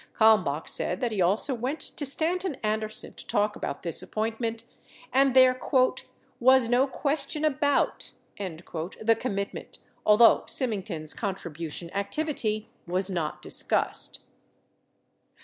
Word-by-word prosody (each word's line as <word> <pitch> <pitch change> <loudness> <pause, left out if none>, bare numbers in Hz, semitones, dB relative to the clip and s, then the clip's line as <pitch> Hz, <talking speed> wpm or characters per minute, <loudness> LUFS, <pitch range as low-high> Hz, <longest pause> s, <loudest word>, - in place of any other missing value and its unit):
Kalmbach 185 -9 +4
said 180 - -1
that 240 -2 -1
he 205 -3 -1
also 200 +10 +3
went 255 +6 -3
to 290 - -1
Stanton 335 +4 +1
Anderson 215 0 -2
to - - -11
talk 210 +1 +1
about 140 - -5
this 170 -2 -2
appointment, 225 +1 -3 0.5
and 270 -1 +4
there 255 -1 +6 0.8
"was 260 0 +5
no 245 +3 +3
question 290 +2 -1
about" 285 -1 0 0.3
the 185 +4 -2
commitment, 200 -5 -4 0.3
although 215 +2 +6
Syming 225 -7 0
ton's 155 -6 -4
contribution 170 -4 -5
activity 215 0 -2 0.2
was 185 +2 +2
not 165 -4 -3
discussed. - - -2
220 Hz, 115 wpm, -27 LUFS, 190-260 Hz, 0.8 s, there